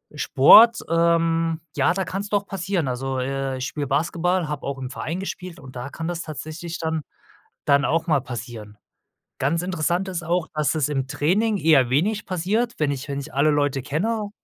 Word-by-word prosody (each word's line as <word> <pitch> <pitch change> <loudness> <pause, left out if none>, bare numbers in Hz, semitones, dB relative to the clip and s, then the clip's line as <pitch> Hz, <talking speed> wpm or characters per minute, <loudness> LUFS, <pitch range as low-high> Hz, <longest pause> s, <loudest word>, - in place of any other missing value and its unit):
Sport, 220 - +7
ähm, 165 -1 +2
ja, - - +3
da 190 +1 -1
kann's 195 +3 -4
doch 205 -1 0
passieren. 185 -4 -2
Also, 130 +1 -2
äh, 135 0 -2
ich 130 - -3
spiele 145 -1 -4
Basketball, 170 +5 0
habe 150 -1 -5
auch 140 -1 -3
im 130 -1 -5
Verein 165 +6 -4
gespielt 185 -2 -6
und 130 -1 -13
da 125 +2 -5
kann 165 +3 -5
das 175 -1 -3
tatsächlich 160 +2 -6
dann 160 -1 -2 0.6
dann 140 +1 +3
auch 165 +2 +1
mal 155 -5 +2
passieren. 115 -4 -8 0.6
Ganz 165 +5 +1
interessant 180 +1 -1
ist 175 -2 -4
auch, 170 0 0
dass 150 -1 +1
es 150 -3 +1
im 135 -3 -1
Training 200 +11 +1
eher 150 -8 +4
wenig 200 +10 +1
passiert, 205 +7 -1
wenn 150 -2 +1
ich 140 0 -5
wenn 140 -1 -3
ich 150 +3 -9
alle 145 +3 +3
Leute 145 -2 +1
kenne 205 - -2
160 Hz, 185 wpm, -23 LUFS, 140-180 Hz, 0.6 s, Sport